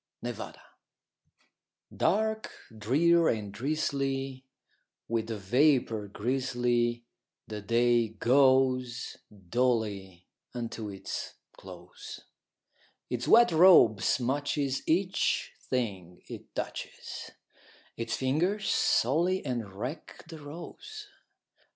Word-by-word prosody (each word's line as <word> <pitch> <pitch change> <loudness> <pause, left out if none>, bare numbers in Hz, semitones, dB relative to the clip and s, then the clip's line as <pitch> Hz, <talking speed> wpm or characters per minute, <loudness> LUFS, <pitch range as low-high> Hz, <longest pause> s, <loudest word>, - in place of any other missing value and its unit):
A - - -2
WET - - -14 0.2
DAY - - -21 1.4
Dark, 220 0 0 0.2
drear, 160 +10 +3
and 105 -3 -2
drizzly, 135 -1 -2 0.6
with 115 -1 -2
vapor 115 +1 +1
grizzly, 120 +1 -1 0.4
The 105 -1 -6
day 120 +2 +2
goes 130 +1 +2
dully 100 -3 -2 0.3
unto 115 -3 -5
its 95 -1 -6 0.2
close; - - -11 0.9
Its 125 0 -2
wet 235 -2 +7
robe 160 - +7
smutches 135 +1 0
each 185 +4 +1 0.2
thing 95 -9 -3
it - - -10
touches, - - -6 0.7
Its 115 0 -3
fingers 175 +11 0
sully 170 +9 +2
and 120 -6 -3
wreck 125 - -7
the 160 - -9
rose. 175 - -9
125 Hz, 90 wpm, -29 LUFS, 110-145 Hz, 1.4 s, wet